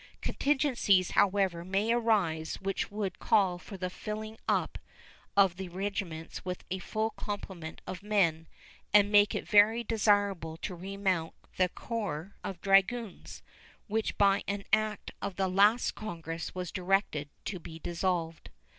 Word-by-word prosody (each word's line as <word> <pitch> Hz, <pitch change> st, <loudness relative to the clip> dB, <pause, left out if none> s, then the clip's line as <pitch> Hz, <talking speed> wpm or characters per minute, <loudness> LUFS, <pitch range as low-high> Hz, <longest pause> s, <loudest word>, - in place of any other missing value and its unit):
Contingencies, 260 Hz, -, +2 dB
however, 190 Hz, -4 st, +2 dB
may 195 Hz, +5 st, 0 dB
arise 200 Hz, -10 st, +1 dB
which 195 Hz, 0 st, -2 dB
would 200 Hz, -3 st, -4 dB
call 185 Hz, -4 st, +3 dB
for 195 Hz, -, -9 dB
the 185 Hz, 0 st, -2 dB
filling 215 Hz, +3 st, -5 dB
up -, -, 0 dB, 0.6 s
of 195 Hz, -3 st, +5 dB
the 190 Hz, -1 st, -5 dB
regiments 185 Hz, -3 st, -4 dB
with 180 Hz, -1 st, -5 dB
a 190 Hz, -, -1 dB
full 220 Hz, +3 st, -2 dB
complement 190 Hz, -7 st, -6 dB
of 185 Hz, -, -6 dB
men 175 Hz, -6 st, +1 dB, 0.5 s
and 205 Hz, 0 st, +6 dB
make 205 Hz, -1 st, +5 dB
it -, -, -3 dB
very 215 Hz, +3 st, +5 dB
desirable 205 Hz, -7 st, +1 dB
to 185 Hz, -, -5 dB
remount 185 Hz, -2 st, -2 dB, 0.2 s
the 185 Hz, -1 st, +3 dB
corps 200 Hz, -5 st, -4 dB
of 190 Hz, -3 st, -5 dB
dragoons, 195 Hz, +3 st, +1 dB, 0.4 s
which 220 Hz, 0 st, -2 dB
by 200 Hz, -1 st, +4 dB
an 200 Hz, 0 st, -2 dB
act 215 Hz, -1 st, +1 dB
of 195 Hz, -, -3 dB
the 190 Hz, -1 st, +1 dB
last 205 Hz, +6 st, +4 dB
Congress 165 Hz, -6 st, -6 dB
was 180 Hz, -2 st, -4 dB
directed 180 Hz, -6 st, 0 dB, 0.2 s
to 185 Hz, -, -4 dB
be 160 Hz, -1 st, -9 dB
dissolved. 170 Hz, -1 st, -2 dB
195 Hz, 140 wpm, -30 LUFS, 175-210 Hz, 0.6 s, and